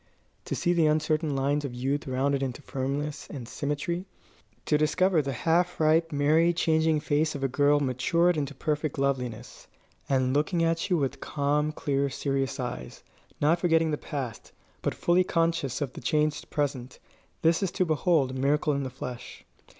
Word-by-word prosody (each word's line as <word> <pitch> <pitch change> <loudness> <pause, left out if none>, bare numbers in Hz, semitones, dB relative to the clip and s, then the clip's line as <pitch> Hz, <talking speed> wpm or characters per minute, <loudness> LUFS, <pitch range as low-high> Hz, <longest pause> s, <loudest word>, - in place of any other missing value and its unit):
To - - -3
see 175 - +1
the 165 -3 +3
uncertain 155 -1 +1
lines 140 +2 0
of 130 -4 -5
youth 135 +4 -2
rounded 135 +2 0
into 135 +2 -4
firmness 140 +3 -3
and 125 -5 -7
symmetry, 150 +7 -3 0.6
to 150 - +2
discover 160 +3 +3
the 140 -1 -3
half 170 +7 +1
ripe, 160 +1 +3
merry, 155 +4 +3
changing 160 -2 +2
face 150 +1 0
of 140 - -5
the 135 - +2
girl 145 +3 +3
matured 145 +7 +2
into 145 -2 -3
perfect 150 +1 -2
loveliness, 125 -4 -3 0.4
and 130 -1 +2
looking 160 +4 +1
at 165 +3 0
you 180 - +3
with 140 -2 -1
calm, 150 +1 0
clear, 140 -2 -1
serious 135 0 -2
eyes, 120 - -6 0.4
not 160 +4 +3
forgetting 165 -2 +2
the - - +1
past, 135 -6 -6 0.3
but - - -1
fully 175 +1 +3
conscious 165 -6 0
of 135 -3 -2
the - - -9
changed 150 +3 0
present 135 -4 -2 0.5
this 165 +2 +3
is 195 - +1
to 185 - +1
behold 155 -4 +2
a - - -7
miracle 145 +3 +1
in 140 - -1
the 130 - -3
flesh. 125 -1 -8
145 Hz, 170 wpm, -27 LUFS, 135-160 Hz, 0.6 s, the